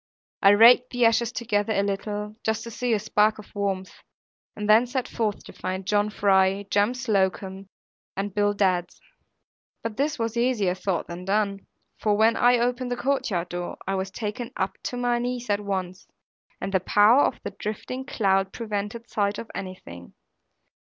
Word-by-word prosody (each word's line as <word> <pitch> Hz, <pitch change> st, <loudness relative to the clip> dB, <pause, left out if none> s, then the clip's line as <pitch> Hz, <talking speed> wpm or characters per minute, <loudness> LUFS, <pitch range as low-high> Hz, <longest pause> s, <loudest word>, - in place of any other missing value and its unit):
I 195 Hz, -, +7 dB
raked 235 Hz, +4 st, +7 dB
the 245 Hz, -1 st, +2 dB
ashes 230 Hz, +1 st, +3 dB
together 220 Hz, -3 st, -1 dB
a 200 Hz, -, +1 dB
little, 210 Hz, +1 st, -3 dB
just 220 Hz, 0 st, -1 dB
to 235 Hz, -, -7 dB
see 245 Hz, +2 st, -2 dB
a -, -, +3 dB
spark 215 Hz, +1 st, +2 dB
of 210 Hz, -, -13 dB
warmth; 195 Hz, -2 st, -3 dB, 0.5 s
and 210 Hz, 0 st, -4 dB
then 220 Hz, +3 st, +6 dB
set 255 Hz, 0 st, -2 dB
forth 215 Hz, -3 st, -2 dB
to -, -, -12 dB
find 185 Hz, +1 st, -4 dB
John 205 Hz, +1 st, +2 dB
Fry, 195 Hz, -1 st, +2 dB
Jem 205 Hz, +5 st, +2 dB
Slocombe, 195 Hz, -5 st, -1 dB, 0.5 s
and 200 Hz, 0 st, -3 dB
Bill 205 Hz, 0 st, +1 dB
Dadds. 185 Hz, -3 st, 0 dB, 0.8 s
But 225 Hz, -2 st, -4 dB
this 285 Hz, +2 st, 0 dB
was 230 Hz, -1 st, -2 dB
easier 235 Hz, -7 st, +1 dB
thought 185 Hz, -2 st, -2 dB
than 175 Hz, +1 st, -8 dB
done; 200 Hz, 0 st, -1 dB, 0.3 s
for 210 Hz, -1 st, +2 dB
when 225 Hz, +1 st, +4 dB
I 245 Hz, 0 st, +4 dB
opened 245 Hz, +1 st, -1 dB
the 245 Hz, -, -2 dB
courtyard 210 Hz, -11 st, -1 dB
door, 175 Hz, 0 st, -5 dB
I 195 Hz, -, -1 dB
was 190 Hz, 0 st, -2 dB
taken 215 Hz, +4 st, -5 dB
up 190 Hz, -, -1 dB
to 245 Hz, -, -3 dB
my 245 Hz, -1 st, +1 dB
knees 245 Hz, -1 st, -3 dB
at 205 Hz, -, +2 dB
once, 190 Hz, -2 st, -4 dB, 0.5 s
and 195 Hz, -, -4 dB
the 190 Hz, -, +4 dB
power 210 Hz, +8 st, +5 dB
of -, -, +1 dB
the -, -, -4 dB
drifting 220 Hz, +6 st, -5 dB
cloud 195 Hz, -7 st, +1 dB
prevented 220 Hz, +1 st, -4 dB
sight 205 Hz, -1 st, -1 dB
of 230 Hz, -, -8 dB
anything. 185 Hz, -, -8 dB
210 Hz, 175 wpm, -25 LUFS, 195-235 Hz, 0.8 s, I